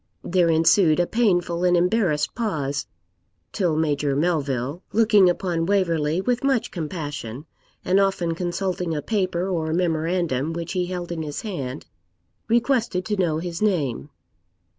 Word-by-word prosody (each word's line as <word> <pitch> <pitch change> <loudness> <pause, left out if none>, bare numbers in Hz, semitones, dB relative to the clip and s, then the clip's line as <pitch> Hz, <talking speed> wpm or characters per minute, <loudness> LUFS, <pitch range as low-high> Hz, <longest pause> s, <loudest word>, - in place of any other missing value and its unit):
There 175 -1 +2
ensued 165 +1 +4
a 175 - +3
painful 175 -6 +1
and 180 -1 +4
embarrassed 175 -5 +1
pause, 150 - -2 0.6
till 175 -5 0
Major 145 -3 0
Melville, 145 -2 -1
looking 210 -4 +5
upon 175 -2 -1
Waverley 170 -4 +1
with 245 +4 -1
much 265 -4 +1
compassion, 150 - -5 0.4
and 190 +2 +3
often 190 -4 +1
consulting 175 0 -2
a 150 - -3
paper 185 -4 -1
or 165 -4 -1
memorandum 165 -3 0
which 170 0 -5
he 180 -2 -1
held 175 -1 -5
in 165 -2 -3
his 150 -2 -5
hand, 145 - -5 0.6
requested 230 -5 +1
to 210 -1 -1
know 170 -5 +1
his 170 +2 -5
name. 150 - 0
175 Hz, 140 wpm, -23 LUFS, 155-190 Hz, 0.6 s, looking